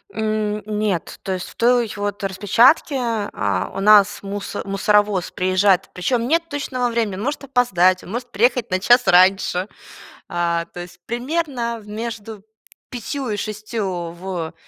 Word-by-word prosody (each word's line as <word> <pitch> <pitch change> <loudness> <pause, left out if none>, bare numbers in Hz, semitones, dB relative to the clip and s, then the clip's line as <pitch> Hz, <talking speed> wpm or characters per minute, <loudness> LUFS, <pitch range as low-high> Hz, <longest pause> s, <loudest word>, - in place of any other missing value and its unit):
М, 215 -1 -1
нет. 210 -5 -2
То 190 - -2
есть, 185 - -5
в - - -16
той, 240 -2 +2
вот, 205 0 -3
распечатке, 215 - +3 0.4
а 100 -2 -1
у - - -3
нас 205 -1 +5
мусо 200 +1 -5
мусоровоз 205 -1 +1
приезжает, 185 +1 +2
причём, 240 +7 0
нет 330 +3 +1
точного 255 -4 -2
времени, 225 -5 -1
он 195 - -6
может 290 +2 -3
опоздать, 185 -9 +2
он 185 - -10
может 240 +1 -5
приехать 240 +1 +1
на 185 - +1
час 245 +4 +4
раньше. 185 0 +4 0.6
А, 170 -2 -1
то - - -8
есть, 175 0 -10
примерно 245 -2 -2
между 220 -1 -6 0.5
5 255 +2 -4
и 210 - -2
6 205 -6 -4
в 175 -2 -5
210 Hz, 145 wpm, -21 LUFS, 185-240 Hz, 0.6 s, нас